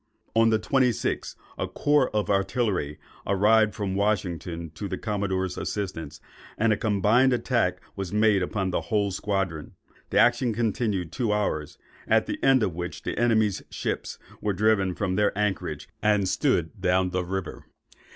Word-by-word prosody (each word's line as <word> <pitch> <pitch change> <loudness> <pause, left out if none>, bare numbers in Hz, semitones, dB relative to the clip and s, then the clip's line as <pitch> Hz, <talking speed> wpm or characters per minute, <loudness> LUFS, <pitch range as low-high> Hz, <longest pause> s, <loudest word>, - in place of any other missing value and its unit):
On 115 +1 +4
the 110 - +3
26th, 125 +1 0 0.2
a - - -1
corps 145 -3 +2
of 105 -1 0
artillery 95 -6 0 0.3
arrived 105 +2 +4
from 100 -3 -2
Washington 90 -5 -2
to 80 +6 -6
the - - -4
commodore's 95 -3 -2
assistance, 80 -7 -4 0.4
and 110 0 +3
a - - +1
combined 110 +5 +3
attack 115 -8 0 0.2
was 95 -3 -4
made 105 -2 +3
on 95 -2 0
the - - 0
whole 100 -2 0
squadron. 95 -5 -3 0.3
The - - 0
action 120 -1 +3
continued 105 -6 -1
two 120 -5 -1
hours; 75 -8 -1 0.3
at - - +3
the - - -5
end 135 -3 +5
of 95 -5 0
which 90 +1 -6
the - - -3
enemy's 110 -4 +2
ships - - -4 0.2
were 105 - 0
driven 100 -2 +2
from 95 -3 -1
their 105 -1 +1
anchorage, 90 -7 -2
and 105 -2 +2
stood 95 - 0
down 90 0 +2
the 90 0 -1
river. 95 0 -5
100 Hz, 155 wpm, -26 LUFS, 90-110 Hz, 0.4 s, end